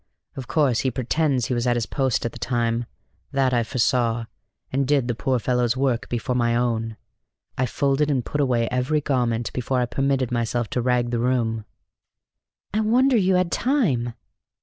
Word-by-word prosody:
Of 130 -2 -7
course 140 -7 +2
he 130 - +1
pretends 130 +1 0
he 125 - -1
was 120 0 0
at 120 - +3
his 120 -2 0
post 130 -3 0
at 120 - -1
the 120 - -11
time: 120 -1 -1 0.4
that 135 -2 +1
I 120 - +3
foresaw, 120 -1 +1 0.5
and 135 0 0
did 140 -4 +2
the 120 - 0
poor 130 +3 0
fellow's 125 +1 0
work 130 -3 0
before 120 +1 -2
my 120 -1 +1
own. 115 -2 -1 0.6
I 130 - 0
folded 140 +4 +1
and 130 -4 0
put 145 - -1
away 120 -4 +1
every 125 +5 +1
garment 120 -5 -1
before 125 +1 -1
I 125 - +2
permitted 135 0 0
myself 120 -1 -1
to 125 - 0
rag 120 -1 +1
the 120 - 0
room." 115 -3 0 1.1
"I 215 - +1
wonder 245 +5 +3
you 190 -4 +3
had 180 -1 +1
time!" 145 - +1
125 Hz, 180 wpm, -23 LUFS, 120-135 Hz, 1.1 s, at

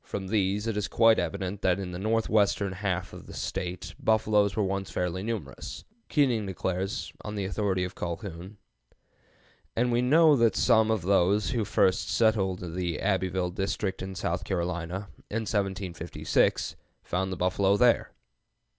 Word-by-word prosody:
From 95 -2 -5
these 105 0 +1
it 115 -2 -1
is 105 - -1
quite 115 -1 +5
evident 100 0 -3
that 95 -1 +2
in 95 -2 -5
the 90 - -5
northwestern 105 -2 +1
half 95 -2 -2
of - - -10
the - - -9
State 90 0 -4
buffaloes 105 -2 +2
were 110 - +1
once 95 0 -2
fairly 90 0 -2
numerous. 100 - -5 0.3
Keating 125 -8 +2
declares, 95 +2 -3
on 105 0 -5
the 100 -2 -2
authority 95 -2 0
of 90 +1 -4
Colhoun, 90 +3 -6 1.2
"and 120 +1 +2
we 120 +1 +2
know 155 +4 +6
that 115 -3 +3
some 110 -3 +4
of 110 -5 0
those 100 +2 +2
who 115 -3 0
first 95 -2 +2
settled 95 -6 +1
the 90 -3 -2
Abbeville 95 -2 0
district 95 +1 -2
in 95 0 -5
South 90 -1 -2
Carolina, 90 +1 -3 0.2
in 115 +2 -1
1756, 95 -5 0 0.3
found 95 +2 -2
the 95 - -4
buffalo 95 +2 +2
there." 120 +1 +4
95 Hz, 155 wpm, -28 LUFS, 90-110 Hz, 1.2 s, know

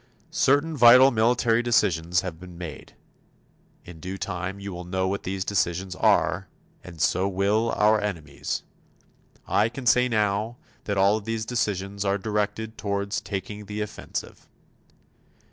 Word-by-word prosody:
Certain 145 +4 +2
vital 125 +1 +8
military 115 0 +2
decisions 90 -7 +2
have 85 -4 -6
been 90 -1 -11
made. 80 -6 -9 0.9
In 85 -2 -11
due 95 +4 -6
time 95 0 -4
you 100 -1 -6
will 90 0 -6
know 95 +1 -1
what 100 +2 -2
these 95 +1 -3
decisions 95 -2 -1
are - - +2 0.4
and 85 -3 -11
so 90 +5 +2
will 100 +4 +1
our 105 0 +4
enemies. 80 -9 -4 0.8
I 105 +3 +2
can 130 +2 -8
say 125 +1 +4
now 105 +1 0 0.3
that 100 -1 -2
all 100 +2 +4
of 105 - -9
these 115 -1 -2
decisions 100 -4 -2
are 100 0 +1
directed 105 +1 -3
toward 100 0 -2
taking 105 0 -4
the 105 +1 -4
offensive. 105 - -6
100 Hz, 145 wpm, -25 LUFS, 95-110 Hz, 0.9 s, vital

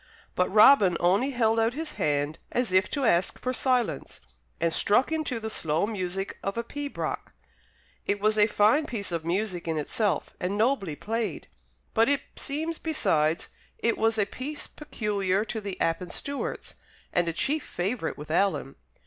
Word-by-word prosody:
But 180 - +1
Robin 210 -4 +7
only 195 +10 +3
held 230 -4 +2
out 225 +2 +2
his 315 0 -4
hand 145 - -1
as 240 -6 0
if 185 0 +4
to 280 -3 -1
ask 175 -4 +2
for 255 - -2
silence, 255 -2 0 0.4
and 165 -1 +1
struck 230 +9 +3
into 310 -7 -1
the 220 0 -4
slow 160 -1 +1
music 195 -2 -3
of 195 +3 -3
a 235 - 0
pibroch. 285 +4 -4 0.8
It 205 - +1
was 215 +1 +2
a 210 -1 +5
fine 220 +8 +3
piece 205 -7 -4
of 165 -2 -2
music 180 +1 -2
in 160 -1 0
itself, 200 +7 0
and 190 +3 -1
nobly 215 - +1
played; 220 -1 -3 0.4
but, 225 +3 +4
it 285 -1 +2
seems 315 +3 -3
besides, 160 - +1 0.3
it 230 - +1
was 225 0 +1
a 210 - +3
piece 275 +8 -6
peculiar 205 -8 -1
to 220 -1 -4
the 200 -2 -5
Appin 165 +2 0
Stewarts 280 0 -4 0.4
and 175 -1 +2
a - - +1
chief 295 - 0
favourite 185 -1 -3
with 150 +1 -8
Alan. 180 -6 +1
210 Hz, 165 wpm, -27 LUFS, 180-250 Hz, 0.8 s, Robin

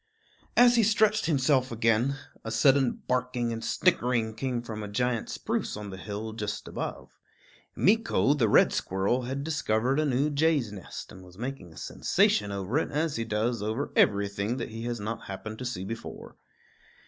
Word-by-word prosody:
As 245 0 +7
he - - +6
stretched 215 -1 +3
himself 135 -4 +2
again, 115 +4 +2 0.3
a 110 - -5
sudden 130 +3 +3
barking 125 -2 0
and 115 - -5
snickering 115 -2 +1
came 125 +1 -2
from 110 -2 -6
a 105 - -5
giant 115 +2 -1
spruce - - -2
on 105 -1 -7
the 95 - -7
hill 105 +3 -5
just 105 -2 -4
above. - - -6 0.6
Meeko, 215 -8 +3
the 120 -7 +2
red - - +5
squirrel, 100 +7 0
had 135 +2 -3
discovered 135 -4 0
a 155 - +2
new 140 +3 +1
jay's 145 -6 +2
nest, 100 -4 -8
and 95 - -12
was 90 0 -15
making 125 -7 -6
a 80 - -15
sensation 105 0 +1
over 100 +8 -1
it, - - -2
as 150 0 -1
he 115 - -1
does 115 +1 -1
over 110 +7 -2
everything 100 +3 +2
that - - -4
he 115 +1 -6
has 120 -1 -3
not 110 +2 -5
happened 110 +3 -7
to 125 - -5
see 110 -7 -4
before. 115 +3 -7
120 Hz, 175 wpm, -28 LUFS, 105-135 Hz, 0.6 s, As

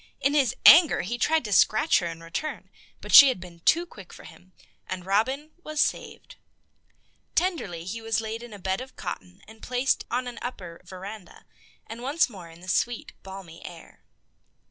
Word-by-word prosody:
In 280 +1 +1
his 275 -6 +2
anger 325 -1 +8
he 240 +6 -4
tried 320 +1 +1
to 210 - -2
scratch 215 - +4
her 175 - -3
in 165 0 -8
return, 300 - -6 0.3
but - - -7
she 280 - +12
had 255 -8 0
been 175 -1 -12
too 335 - +2
quick 195 - -14
for - - -13
him, 185 +1 -16 0.4
and 185 -1 -6
Robin 260 +10 0
was 310 -1 -5
saved. - - -2 1.0
Tenderly 320 - -1
he 225 +5 -5
was 225 0 -1
laid 225 +1 -5
in 240 -1 -11
a 205 - -9
bed 190 +3 -2
of 260 0 -11
cotton 185 +2 -8
and 220 0 -16
placed 250 +2 0
on 250 +2 -1
an 245 -1 -7
upper 185 -9 -7
veranda, 190 +2 -10 0.4
once 255 +5 -1
more 180 -5 -11
in 165 +1 -16
the 185 - -13
sweet, 240 +6 -1
balmy 190 -4 -11
air. 170 -2 -12
220 Hz, 180 wpm, -26 LUFS, 185-260 Hz, 1.0 s, she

